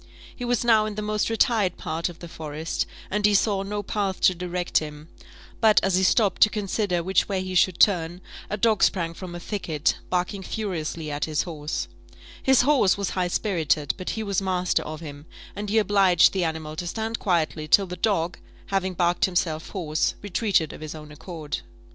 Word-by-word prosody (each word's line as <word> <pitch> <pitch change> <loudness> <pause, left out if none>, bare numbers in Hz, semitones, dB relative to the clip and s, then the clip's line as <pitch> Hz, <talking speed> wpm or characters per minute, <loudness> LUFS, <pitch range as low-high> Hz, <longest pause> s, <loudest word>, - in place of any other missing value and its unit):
He 245 - -5
was 240 -1 0
now 220 -2 +5
in 210 - -5
the 210 - -3
most 210 +1 0
retired 220 -4 +2
part 165 +3 -2
of 170 - -11
the 170 - -9
forest, 160 0 -4 0.2
and 210 +1 0
he 210 0 +5
saw 200 -1 +2
no 205 +1 -3
path 195 -1 -2
to 185 - +5
direct 180 0 -1
him; 150 0 -9 0.5
but, 220 -2 +6
as 195 - +1
he 185 - +3
stopped 195 +1 +2
to 215 - +8
consider 200 -4 -1
which 190 +4 +1
way 190 -2 -1
he 185 0 -5
should 180 -1 +3
turn, 175 -3 +3 0.3
a 210 - -2
dog 215 0 +2
sprang 170 -3 +2
from 175 0 -8
a - - -5
thicket, 170 -6 -1
barking 180 +2 -1
furiously 170 -7 -4
at 145 0 -1
his 155 -1 0
horse: 155 -3 -4 0.5
his 265 -1 +5
horse 265 -10 +4
was 200 -2 -2
high 180 -1 0
spirited, 165 -6 0
but 185 - -5
he 220 - -2
was 200 -2 0
master 185 -1 0
of 155 +1 -7
him, 145 -1 -9 0.3
and 205 0 -4
he 220 - +1
obliged 195 -5 +5
the 190 -2 0
animal 160 -1 -4
to 175 - -3
stand 225 +4 -3
quietly 160 -4 0
till 195 +5 +5
the 180 -1 -6
dog, 180 -3 0 0.3
having 190 -1 -1
barked 175 0 +2
himself 170 -4 -1
hoarse, 160 -5 -1
retreated 200 -5 +1
of - - -11
his 155 0 -6
own 150 -1 -10
accord. 155 0 -6
185 Hz, 195 wpm, -25 LUFS, 165-205 Hz, 0.5 s, to